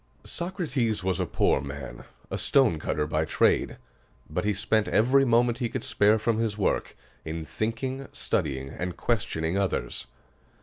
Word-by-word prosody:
Socrates 150 - -2
was 95 -1 0
a 90 - 0
poor - - +2
man, 70 0 -7 0.3
a - - -1
stonecutter 85 - +2
by 75 +1 0
trade; 80 - +2 0.5
but - - -2
he 105 - +2
spent 110 +2 +1
every 130 +5 +4
moment 120 0 +3
he 120 -3 -1
could - - -4
spare 105 +2 +3
from 110 +1 0
his 110 -2 -1
work 100 - 0 0.3
in 80 0 -5
thinking, 130 - -3
studying, 70 -3 -2
and 90 +3 -5
questioning 95 -6 0
others. 95 -11 -2
105 Hz, 145 wpm, -27 LUFS, 80-120 Hz, 0.5 s, every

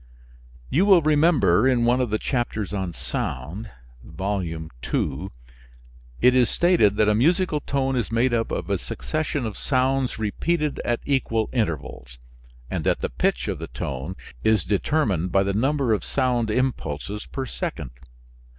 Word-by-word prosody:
You 180 +8 +3
will 185 -5 +6
remember 145 - +4
in 125 -3 +3
one 125 +2 +3
of 125 - 0
the 110 - +1
chapters 110 -5 -2
on 95 -4 -3
sound 85 - -4 0.3
(Volume 85 -3 -4 0.2
II.), 75 +7 -1 0.9
it 125 +1 +6
is 125 -2 +4
stated 170 - +3
that 105 0 +3
a 105 - +4
musical 160 - +2
tone 135 -2 -1
is 120 -4 -1
made 120 +2 +2
up 115 -1 0
of - - -3
a - - +1
succession 150 -4 -3
of 110 -3 -5
sounds 130 -1 +1
repeated 150 +8 -1
at 120 -1 -1
equal 115 -5 0
intervals, 75 - -3 0.5
and - - -3
that - - +1
the - - -2
pitch - - 0
of - - -3
the - - -5
tone 65 +7 -5 0.3
is 110 -5 +3
determined 100 - 0
by 95 - +4
the 100 0 -1
number 135 +2 +1
of 105 - -1
sound 125 -4 0
impulses 105 - -2
per 135 - -4
second. 65 - -5
115 Hz, 155 wpm, -24 LUFS, 95-135 Hz, 0.9 s, will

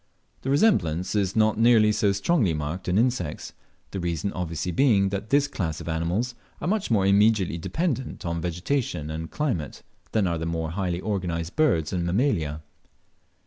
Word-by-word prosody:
The 135 - -4
resemblance 90 - +2
is 100 -3 0
not 110 -1 +3
nearly 115 -2 +5
so 105 -1 +2
strongly 100 - +1
marked 75 +5 -4
in 90 +1 +2
insects, 115 -10 -1 0.4
the 95 - -4
reason 85 +2 -2
obviously 90 0 -3
being, 100 -3 +3
that 100 +2 -4
this 145 +1 +3
class 80 - -3
of - - -9
animals 85 +10 -1 0.3
are - - -4
much 210 +1 0
more 105 -5 +3
immediately 100 -3 +3
dependent 135 - -2
on 85 -1 -2
vegetation 90 - -2
and 80 +1 -5
climate 115 - -3 0.3
than 110 -3 +2
are 85 -2 -1
the 80 - -3
more 80 -1 -2
highly 90 -1 -2
organized 90 -5 -3
birds 85 - +2
and 90 -2 0
Mammalia. 85 - 0
95 Hz, 165 wpm, -25 LUFS, 85-115 Hz, 0.4 s, nearly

